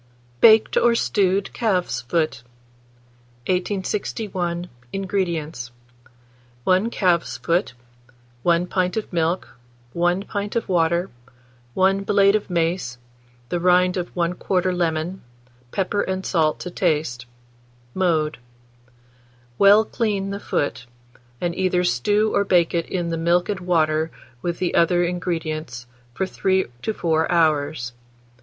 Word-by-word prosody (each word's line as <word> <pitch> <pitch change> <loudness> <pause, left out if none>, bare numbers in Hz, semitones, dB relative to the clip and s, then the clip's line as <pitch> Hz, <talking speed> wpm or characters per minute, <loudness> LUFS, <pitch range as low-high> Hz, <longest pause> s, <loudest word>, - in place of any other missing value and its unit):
BAKED 220 - +6
OR 235 -1 +4
STEWED 195 -3 +1
CALF'S 195 -7 0
FOOT. 155 +5 -1 1.0
1861. 185 -1 -2 0.2
INGREDIENTS. 170 -9 -2 0.9
1 185 - +2
calf's 180 -7 +1
foot, 170 -6 0 0.7
1 170 +2 +2
pint 180 +1 -1
of 215 - -4
milk, 165 -3 0 0.4
1 175 +2 +1
pint 205 +1 -4
of 230 - -1
water, 170 0 +1 0.6
1 195 +1 +3
blade 200 0 +4
of 210 - -2
mace, 165 -7 -1 0.5
the 175 - -1
rind 180 +1 +3
of 180 -2 -3
1/4 180 +1 0
lemon, 170 +1 -1 0.5
pepper 200 +6 -1
and 190 0 -3
salt 155 -4 +1
to 180 - -6
taste. 150 -9 -1 0.7
Mode. 160 -6 0 1.2
Well 205 +2 +7
clean 205 -4 -1
the 200 - -4
foot, 140 -9 -2 0.5
and 175 -1 -1
either 180 0 +1
stew 205 - +1
or 200 - +3
bake 175 -4 +2
it 170 -1 -1
in 175 -2 -2
the 165 - -2
milk 170 +3 +2
and 200 -2 -1
water 160 -3 +1 0.3
with 175 -1 -2
the 180 -1 -1
other 175 +1 +3
ingredients 160 -7 -3 0.3
from 190 - 0
3 190 0 +1 0.2
to - - -1
4 160 -5 0
hours. 150 -6 +1
180 Hz, 120 wpm, -22 LUFS, 165-195 Hz, 1.2 s, Well